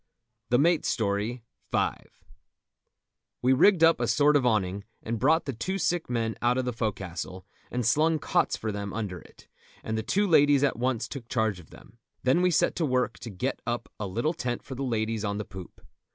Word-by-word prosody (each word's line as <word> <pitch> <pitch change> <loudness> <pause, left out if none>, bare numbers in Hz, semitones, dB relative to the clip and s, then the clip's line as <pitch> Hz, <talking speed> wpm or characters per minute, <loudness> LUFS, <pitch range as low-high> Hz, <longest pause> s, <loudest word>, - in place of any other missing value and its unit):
THE 120 - +4
MATE'S 165 +4 +3
STORY.—V. 110 +2 -2 1.6
We 130 +1 +5
rigged 170 +5 +5
up 165 0 +6
a - - +1
sort 150 0 +4
of 135 -3 +3
awning, 100 -3 0 0.2
and 115 0 -3
brought 160 +7 +3
the 135 - -3
two 185 - -3
sick 175 -4 -1
men 115 -2 -1
out 120 +1 +2
of 130 - 0
the 125 - -2
fo'castle, 95 -4 -4 0.2
and 125 -1 -2
slung 155 +7 +3
cots - - +1
for 110 - -3
them 100 -1 -5
under 100 -5 -4
it, - - -18 0.4
and 110 - -3
the 110 - -1
two 200 - +1
ladies 145 -5 +5
at 135 -5 +1
once 125 -1 0
took 125 -5 -8
charge 110 -5 0
of 85 - -15
them. 115 - -17 0.2
Then 130 +7 +3
we 180 - +4
set 170 - +2
to 170 - 0
work 125 -1 0
to 115 - -7
get 95 -3 -3
up 120 0 -2
a 105 - -3
little 115 - -1
tent 120 -6 -3
for 135 - -8
the 130 - -6
ladies 115 -4 -1
on 100 -1 -1
the 105 - -4
poop. 95 -3 -11
120 Hz, 200 wpm, -27 LUFS, 110-145 Hz, 1.6 s, up